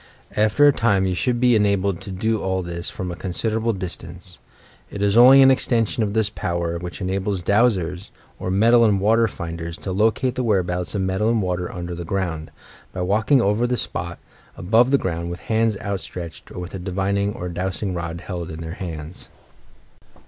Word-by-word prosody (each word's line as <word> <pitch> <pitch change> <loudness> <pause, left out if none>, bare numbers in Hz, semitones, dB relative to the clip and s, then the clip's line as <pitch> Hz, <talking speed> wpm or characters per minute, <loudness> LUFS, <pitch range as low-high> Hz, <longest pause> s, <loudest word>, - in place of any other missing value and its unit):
After 110 +7 +4
a - - +7
time, 100 -6 +2
you 95 - 0
should 120 +6 0
be 125 -1 +4
enabled 100 -3 +1
to 100 - -8
do 110 +4 -1
all 95 -1 -1
this 85 0 -4
from 90 -1 -5
a - - -5
considerable 110 +6 -1
distance. 90 -2 -8 0.5
It 100 - -4
is 100 0 +2
only 130 +3 +9
an 135 - +7
ex 130 - +1
tension 115 -1 +1
of 105 -2 0
this 110 -2 +2
power 85 -4 -3
which 90 +3 -7
enables 95 0 -2
"dowsers" 100 -4 +1 0.3
or - - -3
metal 115 +5 +5
and 105 -3 +3
water 115 +3 +3
finders 85 -3 -6
to 95 - -5
locate 110 +6 +1
the 130 - -2
whereabouts 90 -4 0
of 100 - 0
metal 95 +4 0
and 115 -1 +2
water 90 -2 -2
under 90 0 -5
the 85 0 -5
ground, 85 -3 -3 0.4
by 90 - -5
walking 110 +7 +3
over 105 +5 +2
the 125 0 0
spot, - - -4 0.4
above 120 +8 +3
ground, 85 -6 -3
with 85 - -6
hands 110 -2 +1
outstretched, 90 -5 -6
or - - -10
with 90 0 -6
a 95 - -5
divining 100 +2 -1
or 90 - -5
dowsing 90 +2 -3
rod 85 -1 -4
held 90 -4 -5
in 80 0 -7
their 80 0 -6
hands. 80 -1 -7
95 Hz, 190 wpm, -22 LUFS, 90-110 Hz, 0.5 s, only